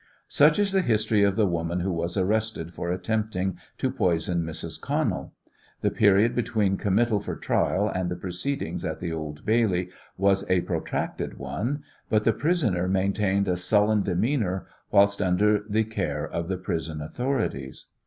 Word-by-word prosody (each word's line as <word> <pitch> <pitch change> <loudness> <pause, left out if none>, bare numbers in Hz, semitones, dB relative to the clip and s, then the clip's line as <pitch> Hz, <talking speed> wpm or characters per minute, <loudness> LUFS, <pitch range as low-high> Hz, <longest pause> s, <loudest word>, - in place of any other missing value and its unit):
Such 150 +2 +5
is 205 -1 +2
the 190 0 +3
history 110 - +2
of 100 -1 +3
the 110 - +3
woman 85 -1 -1
who 95 +2 -1
was 85 +1 -2
arrested 100 -3 -1
for 85 - -4
attempting 95 0 -1 0.2
to - - 0
poison 85 -1 +1
Mrs. 80 0 -5
Connell. - - -1 0.5
The - - +1
period 105 +3 +4
between 105 -5 +1
committal 105 +3 +2
for 100 - -5
trial 100 +3 +1
and 95 -3 -1
the 90 - -2
proceedings 90 +10 -3
at - - -3
the 85 -2 -3
Old 75 -2 -6
Bailey 100 -6 +2 0.3
was 95 0 +3
a 95 -1 +3
protracted - - -3
one, 105 - -3 0.3
but 110 -1 +2
the 115 - +3
prisoner 120 - +1
maintained 100 +1 +1
a 90 - +2
sullen 105 +4 +3
demeanour 95 0 0 0.2
whilst 100 0 +4
under 105 +3 +3
the 110 +2 +2
care 110 +1 -3
of 85 0 -3
the 95 0 -2
prison 80 -3 -3
authorities. 80 - -3
95 Hz, 160 wpm, -26 LUFS, 90-110 Hz, 0.5 s, Such